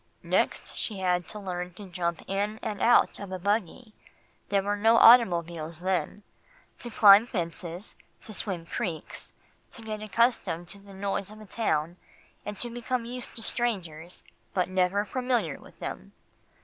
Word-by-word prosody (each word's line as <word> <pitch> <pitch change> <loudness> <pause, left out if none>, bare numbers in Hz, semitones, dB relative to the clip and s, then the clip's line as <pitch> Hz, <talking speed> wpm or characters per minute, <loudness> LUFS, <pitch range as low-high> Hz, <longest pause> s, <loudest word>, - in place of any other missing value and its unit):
"Next - - 0
she 215 - -3
had 180 -2 0
to 215 - -7
learn 180 -3 -5
to 205 0 -9
jump 170 -2 -3
in 205 +2 -1
and 205 -2 -4
out 240 - +4
of 200 -2 -7
a 185 - -3
buggy 205 +3 -2 0.6
there 200 -1 +2
were 205 +1 0
no 225 +3 +4
automobiles 170 -9 +5
then 190 +2 -1 0.6
to 240 - -6
climb 210 0 +7
fences, 175 -1 -4 0.3
to 215 - -8
swim 185 -5 -4
creeks, 170 -4 -5 0.4
to 230 - -9
get 215 -1 -5
accustomed 215 -6 +1
to 200 - -11
the 200 -1 -14
noise 195 0 -2
of 215 +1 -12
a 215 - -11
town, 175 -6 -1 0.5
and 210 -1 -5
to 240 - -4
become 240 0 -2
used 245 +1 -7
to 225 - -4
strangers, 180 -10 -3 0.3
but 185 -1 +1
never 185 +2 +1
familiar 250 +3 -1
with - - -16
them. - - -7
200 Hz, 160 wpm, -28 LUFS, 180-220 Hz, 0.6 s, climb